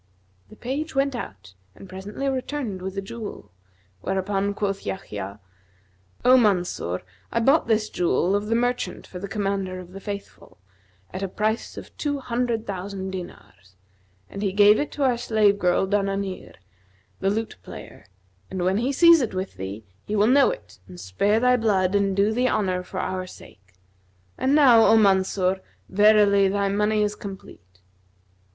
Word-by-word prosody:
The - - -14
page 275 +7 -4
went 275 0 +1
out 95 - -8 0.2
and 195 - -12
presently 195 +8 -5
returned 260 -6 -3
with 190 +1 -5
the 195 - -3
jewel, 215 - -8 0.5
whereupon 195 - -1
quoth 195 -1 -2
Yahya, 105 - -6 0.9
'O 255 +1 +7
Mansur, 180 - +1 0.3
I 230 - +1
bought 275 +6 +3
this 215 -1 +2
jewel 180 +1 +1
of 205 +1 -1
the 225 - +1
merchant 245 +1 -1
for 180 - -9
the 200 - -5
Commander 195 -2 -2
of 180 -1 -11
the 195 - -9
Faithful, 200 0 -8 0.6
at 185 - -5
a 195 - -1
price 215 +4 -2
of - - -10
two 290 -1 -1
hundred 235 -3 -2
thousand 190 0 -5
dinars,[FN#247] 95 - -10 0.6
and 195 - -6
he 200 -2 0
gave 205 +1 +6
it 290 - -2
to 290 - -2
our 250 -3 +2
slave 215 -4 +2
girl 180 0 +2
Dananir, 195 -1 -2 0.6
the 195 - +1
lute 220 +2 -3
player; - - -11 0.4
and 185 -2 -3
when 190 +2 +2
he 250 +4 0
sees 335 +2 +6
it 230 -6 -3
with 185 +1 -3
thee, 100 +3 -6 0.2
he 210 - -2
will 205 0 +4
know 270 +3 +5
it 95 -2 -8
and 90 -2 -11
spare 200 - +1
thy 250 +1 +4
blood 200 -5 +1
and 200 -1 +1
do 200 +2 +3
thee 250 +2 +1
honour 185 -5 0
for 180 - -7
our 185 0 -3
sake; 95 - -16 0.6
and 270 +2 +1
now, 250 -7 +7
O 225 - +6
Mansur, 190 -2 +2 0.3
verily 205 -1 +5
thy 200 +1 0
money 210 +1 +1
is 210 0 0
complete.' 95 - -11
200 Hz, 165 wpm, -24 LUFS, 185-225 Hz, 0.9 s, O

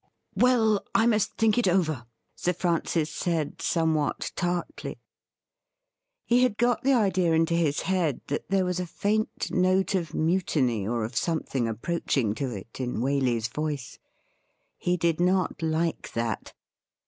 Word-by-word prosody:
' - - -53
Well, 225 -5 +3
I 225 - +5
must 215 -3 +2
think 225 +1 +2
it 240 - +2
over,' 155 -9 +1 0.3
Sir 180 - 0
Francis 165 -2 0
said, 165 -4 -2
somewhat 160 -3 0
tartly. 175 -1 -3 1.3
He 240 +1 +3
had 250 -5 +2
got 240 +1 +2
the 275 +1 +3
idea 185 -7 +2
into 165 +1 +2
his 160 -4 +1
head 180 -7 0
that 145 - -4
there 195 -1 +2
was 180 0 -1
a 180 - -3
faint 215 +5 -1
note 185 +1 +2
of 170 -4 -2
mutiny 150 - +1
or 115 0 -1
of 115 +3 -5
something 140 -7 -1
approaching 115 -1 -1
to 135 +3 -3
it 110 +1 -8
in 125 -3 -2
Waley's 125 -3 +1
voice. 145 +1 -4 0.8
He 180 0 +1
did 170 -1 +1
not 180 0 +1
like 160 +1 -1
that. 115 -2 -3
170 Hz, 150 wpm, -27 LUFS, 140-190 Hz, 1.3 s, I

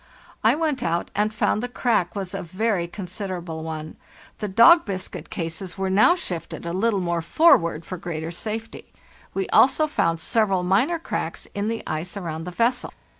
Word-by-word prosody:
I - - +5
went 305 -5 -1
out, 170 -7 -1
and 210 +1 +1
found 215 0 +1
the 245 - -2
crack 230 -7 0
was 195 -2 -4
a 195 - -3
very 185 +1 -1
con 190 +2 -7
siderable 180 -3 -5
one. 155 -1 -6 0.4
The 210 - -2
dog 235 - +7
biscuit 185 -3 -6
cases 175 +3 -5
were 190 0 -1
now 215 - +5
shifted 175 - -5
a 170 - -3
little 200 +1 +1
more 170 -1 -1
forward 170 - +4
for 185 - -5
greater 165 -1 -4
safety. 220 +5 -6 0.4
We 195 -1 -1
also 270 +4 +5
found 165 - 0
several 195 -1 +1
minor 220 - +2
cracks 330 - -4
in 205 +1 -2
the 225 0 -2
ice 160 +5 -4
around 165 -4 -5
the - - -4
vessel. 235 +6 0
190 Hz, 175 wpm, -24 LUFS, 170-225 Hz, 0.4 s, dog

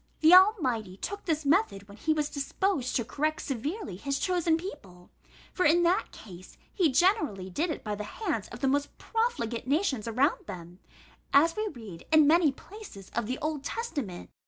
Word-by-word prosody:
The 320 +2 +7
Almighty 260 - +4
took 405 - -6
this 315 -3 -1
method 280 - +1
when 200 - -13
he 310 +9 -1
was 305 -1 +1
disposed 285 0 -1
to 235 - 0
correct 310 +5 -1
severely 285 - -4
his 275 +6 -2
chosen 345 -1 +1
people; 200 - -10 0.4
for, 365 - 0
in 345 +3 +4
that 345 +2 +1
case, 185 -3 -13 0.2
he 345 -7 +2
generally 275 - +1
did 325 - -1
it 310 - -4
by 210 - -3
the 210 0 -4 0.2
hands 260 - -1
of 240 - -10
the 270 - +2
most 285 +2 -1
profligate 445 - -2
nations 275 - 0
around 275 - +1
them, 175 0 -9 0.6
as 330 +4 +5
we 430 0 -1
read 220 - -10
in 310 -1 +7
many 320 0 +5
places 325 - -12
of 235 -2 -2
the 255 +3 -2
Old 305 -2 -2
Testament. 280 - -5
290 Hz, 180 wpm, -28 LUFS, 225-350 Hz, 0.6 s, The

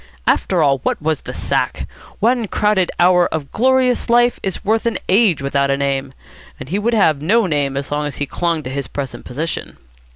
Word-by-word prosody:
After 175 -4 +2
all, 135 -2 +2
what - - -2
was 155 -1 -1
the - - -7
sack? - - -2 0.3
One 235 0 +1
crowded 205 -3 +1
hour 180 0 +5
of 150 -3 -5
glorious 255 +1 +2
life 240 0 +3
is 190 -2 -4
worth 220 +3 +1
an 230 - 0
age 190 -7 +3
without 140 0 0
a 140 - +1
name, 135 -1 -1 0.5
and 130 - -8
he 195 +5 -1
would 230 +3 0
have 160 -9 +3
no 215 +8 +3
name 145 -5 -1
as 140 0 -4
long 150 0 -1
as 145 - -6
he 145 - -1
clung 165 +1 -2
to 130 - -6
his 140 -1 -4
present 135 -4 -6
position. 155 +7 -5
165 Hz, 200 wpm, -18 LUFS, 140-215 Hz, 0.5 s, hour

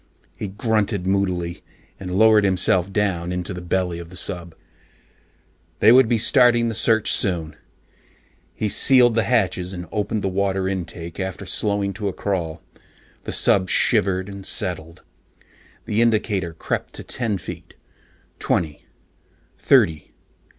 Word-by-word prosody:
He 105 - -5
grunted 105 -1 -1
moodily 90 -3 -1 0.4
and 90 -1 -5
lowered 110 0 +5
himself 95 -1 +2
down 95 -4 -1
into 90 +1 -4
the 90 - -7
belly 90 -1 -2
of 85 -1 -10
the 90 - -13
sub. 85 -2 -4 1.2
They 110 - +6
would 125 -1 +6
be 120 - +2
starting 120 0 +3
the - - -3
search 110 0 +2
soon. 85 -6 -1 1.0
He 110 - -2
sealed 120 +3 +5
the 115 - +2
hatches 95 -5 0
and 90 -1 -7
opened 105 0 -2
the - - 0
water 95 0 -1
intakes 85 -2 -5
after 95 -3 -5
slowing 100 -2 0
to 100 +1 -4
a 95 - -2
crawl. 85 -5 -3 0.6
The - - -4
sub 95 -2 +3
shivered 95 0 +2
and 100 -1 -9
settled. 85 -3 -4 0.8
The 110 +2 0
indicator 105 -6 0
crept 80 - -4
to - - -7
ten 115 -5 -2
feet, - - -10 0.6
twenty, 75 -3 -2 0.7
thirty. 100 - +2
95 Hz, 135 wpm, -21 LUFS, 90-105 Hz, 1.2 s, They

